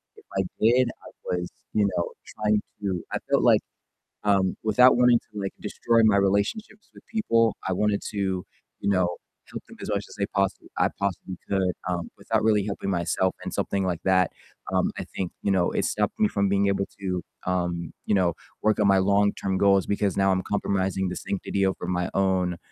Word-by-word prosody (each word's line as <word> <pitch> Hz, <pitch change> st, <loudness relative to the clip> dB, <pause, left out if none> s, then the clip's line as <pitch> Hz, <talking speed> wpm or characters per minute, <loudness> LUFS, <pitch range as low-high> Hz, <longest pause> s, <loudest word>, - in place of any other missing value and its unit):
if -, -, -18 dB
I 95 Hz, -, +3 dB, 0.2 s
did, 120 Hz, +2 st, +4 dB, 0.2 s
I -, -, -11 dB
was, 90 Hz, 0 st, -2 dB, 0.3 s
you 105 Hz, -1 st, +3 dB
know, 85 Hz, -, -1 dB
trying 105 Hz, 0 st, 0 dB, 0.2 s
to 95 Hz, -3 st, -2 dB
I -, -, 0 dB
felt -, -, +3 dB
like, -, -, +5 dB, 0.6 s
um, 95 Hz, -2 st, +2 dB
without 125 Hz, +3 st, +6 dB
wanting 125 Hz, -1 st, +5 dB
to, 105 Hz, -, -5 dB
like, 95 Hz, -, -3 dB
destroy 115 Hz, -1 st, +1 dB
my 105 Hz, -2 st, +5 dB
relationships 100 Hz, -, -1 dB
with -, -, -15 dB
people, 115 Hz, -, +2 dB
I -, -, 0 dB
wanted 105 Hz, +2 st, +1 dB
to, 95 Hz, -3 st, -1 dB, 0.4 s
you 100 Hz, -, 0 dB
know, 90 Hz, -2 st, +1 dB, 0.3 s
help -, -, -7 dB
them -, -, -13 dB
as -, -, -6 dB
much 100 Hz, -1 st, -1 dB
as -, -, -12 dB
they 100 Hz, -, +1 dB
possi 100 Hz, -1 st, 0 dB
I -, -, +3 dB
possibly 95 Hz, -2 st, -3 dB
could, 95 Hz, -2 st, +1 dB, 0.2 s
um, 85 Hz, -2 st, -2 dB
without 110 Hz, +2 st, 0 dB
really 105 Hz, -2 st, +3 dB
helping 100 Hz, -1 st, -3 dB
myself 90 Hz, +1 st, +1 dB
in -, -, -5 dB
something 100 Hz, -1 st, -1 dB
like 90 Hz, -3 st, -2 dB
that. 95 Hz, -2 st, +3 dB, 0.4 s
Um, -, -, +2 dB
I -, -, -3 dB
think, 95 Hz, -2 st, -4 dB
you 100 Hz, -, +1 dB
know, 90 Hz, -2 st, +2 dB
it -, -, 0 dB
stopped -, -, -1 dB
me 105 Hz, -, +4 dB
from 100 Hz, -1 st, +1 dB
being 100 Hz, 0 st, +2 dB
able 100 Hz, 0 st, +1 dB, 0.2 s
to, 90 Hz, -3 st, -2 dB, 0.2 s
um, 85 Hz, -2 st, -1 dB
you -, -, +2 dB
know, 90 Hz, -3 st, +2 dB, 0.3 s
work 110 Hz, 0 st, +2 dB
on 100 Hz, -, +4 dB
my 95 Hz, -1 st, +5 dB
long-term 100 Hz, 0 st, +2 dB
goals 100 Hz, -2 st, +4 dB
because 100 Hz, -1 st, 0 dB
now 95 Hz, -1 st, +3 dB
I'm 95 Hz, 0 st, 0 dB
compromising 95 Hz, -2 st, -1 dB
the 90 Hz, -, -3 dB
sanctity 100 Hz, 0 st, -2 dB
over 95 Hz, -2 st, -2 dB
my 90 Hz, -1 st, -1 dB
own, 95 Hz, -2 st, +1 dB
100 Hz, 200 wpm, -26 LUFS, 95-105 Hz, 0.6 s, without